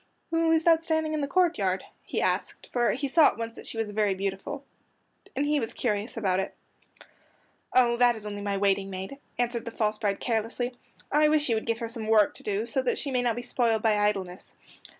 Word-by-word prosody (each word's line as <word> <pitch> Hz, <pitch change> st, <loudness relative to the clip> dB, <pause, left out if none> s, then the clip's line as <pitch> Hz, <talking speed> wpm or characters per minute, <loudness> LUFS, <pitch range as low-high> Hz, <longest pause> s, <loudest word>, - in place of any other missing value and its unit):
"Who 330 Hz, 0 st, +2 dB
is 320 Hz, 0 st, +3 dB
that 330 Hz, -1 st, +4 dB
standing 315 Hz, -1 st, 0 dB
in 305 Hz, -, -1 dB
the 280 Hz, -, -1 dB
courtyard?" 275 Hz, -, +1 dB, 0.2 s
he -, -, -3 dB
asked, -, -, -2 dB
for 240 Hz, -1 st, +2 dB
he 280 Hz, +3 st, -2 dB
saw 310 Hz, +2 st, +6 dB
at -, -, -1 dB
once 230 Hz, 0 st, -5 dB
that -, -, -10 dB
she -, -, -6 dB
was 220 Hz, -2 st, -2 dB
very 205 Hz, -2 st, +1 dB
beautiful, 195 Hz, +9 st, -4 dB, 0.7 s
and 280 Hz, -, +1 dB
he 295 Hz, 0 st, +2 dB
was 225 Hz, -3 st, -3 dB
curious 215 Hz, -1 st, -2 dB
about 190 Hz, -4 st, +1 dB
it. 195 Hz, -, -3 dB, 1.2 s
"Oh, 240 Hz, -2 st, +4 dB
that 245 Hz, -1 st, +5 dB
is 215 Hz, -1 st, -5 dB
only 205 Hz, -1 st, -5 dB
my 200 Hz, -1 st, -1 dB
waiting 195 Hz, 0 st, +1 dB
maid," 190 Hz, +8 st, -6 dB, 0.2 s
answered 240 Hz, -1 st, 0 dB
the -, -, -3 dB
false 215 Hz, -2 st, -1 dB
bride 200 Hz, -3 st, 0 dB
carelessly. 235 Hz, +2 st, -1 dB, 0.4 s
"I 300 Hz, +1 st, +5 dB
wish 300 Hz, -1 st, +3 dB
you 230 Hz, -, +3 dB
would 220 Hz, -, -3 dB
give 230 Hz, -1 st, +1 dB
her 230 Hz, -1 st, -4 dB
some 225 Hz, -1 st, -4 dB
work 215 Hz, -2 st, +4 dB
to -, -, -8 dB
do 210 Hz, +1 st, -1 dB
so 240 Hz, +3 st, 0 dB
that 255 Hz, -, 0 dB
she 280 Hz, -, -3 dB
may 250 Hz, -1 st, +1 dB
not 240 Hz, -2 st, +1 dB
be 240 Hz, -, -5 dB
spoiled 230 Hz, -3 st, +1 dB
by 220 Hz, -2 st, +4 dB
idleness." 195 Hz, -3 st, -1 dB
230 Hz, 225 wpm, -27 LUFS, 205-270 Hz, 1.2 s, saw